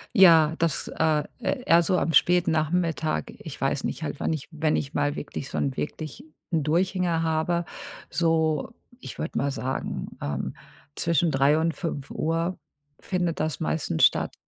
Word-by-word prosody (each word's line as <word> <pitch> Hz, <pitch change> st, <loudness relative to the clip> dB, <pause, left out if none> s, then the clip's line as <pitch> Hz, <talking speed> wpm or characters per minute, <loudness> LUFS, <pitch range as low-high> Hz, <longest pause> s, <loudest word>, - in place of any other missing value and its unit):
Ja, 165 Hz, -4 st, +7 dB
das, 165 Hz, -3 st, 0 dB
äh, 155 Hz, -2 st, +1 dB, 0.2 s
eh 245 Hz, +3 st, -2 dB
eher 170 Hz, +1 st, +6 dB
so 180 Hz, +2 st, +1 dB
am 165 Hz, -, 0 dB
späten 175 Hz, +4 st, +4 dB
Nachmittag. 160 Hz, -, 0 dB
Ich -, -, -9 dB
weiß -, -, 0 dB
nicht, -, -, -3 dB
halt -, -, -4 dB
wann -, -, 0 dB
ich 155 Hz, -4 st, -3 dB
wenn 155 Hz, -1 st, 0 dB
ich 140 Hz, +1 st, -3 dB
mal 145 Hz, +1 st, 0 dB
wirklich 140 Hz, -2 st, -6 dB
so -, -, -4 dB
'n 135 Hz, -2 st, 0 dB
wirklich 155 Hz, 0 st, -5 dB, 0.3 s
'n 165 Hz, -2 st, +2 dB
Durchhänger 170 Hz, +2 st, +1 dB
habe, 160 Hz, +2 st, 0 dB, 0.5 s
so, 160 Hz, -2 st, +1 dB, 0.3 s
ich -, -, -9 dB
würde 160 Hz, -, -4 dB
mal 140 Hz, -, +1 dB
sagen, 130 Hz, 0 st, -3 dB
ähm, 70 Hz, -1 st, -3 dB, 0.4 s
zwischen 170 Hz, -1 st, +2 dB
3 140 Hz, +2 st, +4 dB
und 165 Hz, +1 st, +1 dB
5 165 Hz, +2 st, -2 dB, 0.4 s
findet 175 Hz, -3 st, -1 dB
das 155 Hz, -4 st, -1 dB
meistens 160 Hz, -, +2 dB
statt. -, -, +1 dB
160 Hz, 160 wpm, -26 LUFS, 150-170 Hz, 0.5 s, Ja